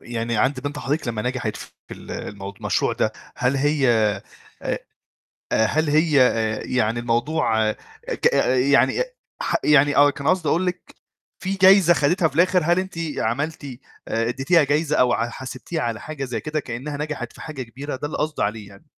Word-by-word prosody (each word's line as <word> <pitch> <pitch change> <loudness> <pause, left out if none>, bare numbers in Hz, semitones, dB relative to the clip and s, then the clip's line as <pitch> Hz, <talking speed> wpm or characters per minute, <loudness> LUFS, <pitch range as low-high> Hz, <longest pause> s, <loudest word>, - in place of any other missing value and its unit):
يعني 115 -1 -3
عند 130 +4 +1
بنت 145 +1 -5
حضرتِك 145 -1 -2
لمّا 110 -2 -2
نجحِت 125 -4 -2
في - - -10 0.2
ال - - -12
الموض 100 0 -7
المشروع - - 0
ده، - - 0 0.2
هل 125 +2 +1
هي 145 0 +2 0.8
أ - - -2 0.9
هل 155 +6 0
هي 155 -1 +4
آآ 110 -3 +2
يعني 120 -1 0
الموضوع 120 -2 +1 0.4
ك - - +1 0.4
يعني 140 - +4 0.4
ح - - +1
يعني 145 -1 +4
آه 145 0 +6
كان 140 0 -4
قصدي 185 -4 +1
أقول 180 +3 +1
لِك 180 -1 -5 0.4
في 185 +2 -3
جايزة 190 -2 +6
خدِتها 165 +3 +2
في 140 - -15
الآخر؟ 180 +2 +3
هل 175 +2 +3
أنتِ 190 0 -3 0.2
عملتِ 145 +8 -2 0.4
آآ 115 +1 0
اديتيها 135 +6 +3
جايزة 150 +2 +1
أو 125 -1 +4
ع 115 0 0
حاسِبتيها 130 +6 -5
على 115 -2 -2
حاجة 150 -3 -5
زي 125 -2 -4
كده 155 0 -3
كأنها 130 +3 -5
نجحِت 145 -5 -4
في - - -16
حاجة 150 -4 -6
كبيرة؟ 130 +4 -6
ده 145 - -4
اللي 150 - -5
قصدي 155 0 -1
عليه 105 -1 -3
يعني. 100 -1 -17
140 Hz, 175 wpm, -22 LUFS, 120-155 Hz, 0.9 s, آه